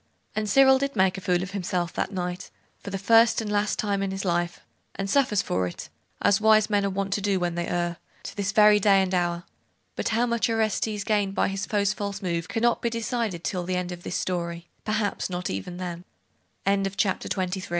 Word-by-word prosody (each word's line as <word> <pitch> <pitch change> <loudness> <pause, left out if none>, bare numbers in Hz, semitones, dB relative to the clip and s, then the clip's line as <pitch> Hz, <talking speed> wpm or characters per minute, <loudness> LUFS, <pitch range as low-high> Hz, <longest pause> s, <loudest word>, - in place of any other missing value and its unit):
And 215 -1 -1
Cyril 265 +3 +6
did 275 0 -2
make 190 -1 +3
a - - -13
fool 180 -1 +1
of 185 - -6
himself 180 -3 -2
that - - -2
night, 180 -1 -4 0.3
for - - -8
the 195 - -3
first 225 +3 +5
and 215 -2 -3
last 205 0 +1
time 200 -3 0
in 195 - -1
his 195 +1 -4
life; 175 -1 -1 0.3
and 195 - -3
suffers 210 -4 +2
for 90 0 0
it, 90 - -8 0.3
as 205 +1 +4
wise 215 0 +4
men 205 -1 +3
are 200 - +1
wont 195 0 -2
to 205 - -1
do 195 -1 +1
when 175 -1 -1
they 170 0 -2
err, 175 -1 -1 0.3
to - - -7
this 200 -1 -1
very 210 0 +6
day 195 -1 +5
and 190 0 -3
hour: 175 -1 0 0.5
but - - -1
how 230 +2 +2
much 235 -1 0
Orestes 220 -2 0
gained 205 -2 0
by - - +2
his 195 +1 -3
foe's 205 -1 +1
false 200 -1 -4
move 170 -3 -2
cannot 235 +1 +1
be 235 - 0
decided 230 -6 -2
till 180 -2 -2
the 185 +1 -2
end 180 0 -2
of 175 -1 -7
this 175 - -3
story; 170 -1 -3 0.2
perhaps 215 -2 -1
not 180 0 -3
even 95 - -5
then. 175 -1 -5
195 Hz, 210 wpm, -26 LUFS, 180-215 Hz, 0.5 s, Cyril